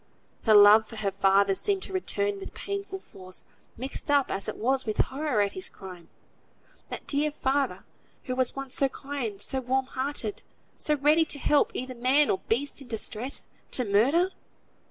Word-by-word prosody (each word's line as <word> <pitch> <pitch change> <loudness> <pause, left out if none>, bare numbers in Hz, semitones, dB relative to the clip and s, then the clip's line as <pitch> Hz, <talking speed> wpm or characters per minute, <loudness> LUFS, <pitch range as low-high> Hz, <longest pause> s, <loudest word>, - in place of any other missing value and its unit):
Her 220 -2 +6
love 210 +1 +8
for 225 - -10
her 210 -2 -1
father 195 0 +3
seemed 390 - -1
to - - -6
return 205 - -1
with - - -9
painful 400 -1 -5
force, 185 - -10 0.3
mixed 260 +4 -5
up 285 -2 +3
as 195 0 -2
it - - -6
was 265 +4 +1
with 215 -1 -3
horror 270 -5 +1
at 200 -1 +1
his 375 - -4
crime. 180 -3 -11 0.8
That - - -5
dear 295 +1 +1
father, 280 -2 -1 0.4
who 255 - -3
was 255 -1 0
once 275 -1 -4
so 275 - +2
kind, 260 -8 -5
so 265 - +1
warm 260 +1 0
hearted, 260 -5 -3 0.3
so 300 - 0
ready 300 +3 +4
to 295 - 0
help 290 +1 +3
either 255 0 -3
man 260 +4 +3
or 190 - 0
beast 280 +5 -1
in 270 - -11
distress, 230 +3 -2 0.3
to 250 - +2
murder! 270 - +3
255 Hz, 175 wpm, -27 LUFS, 210-285 Hz, 0.8 s, love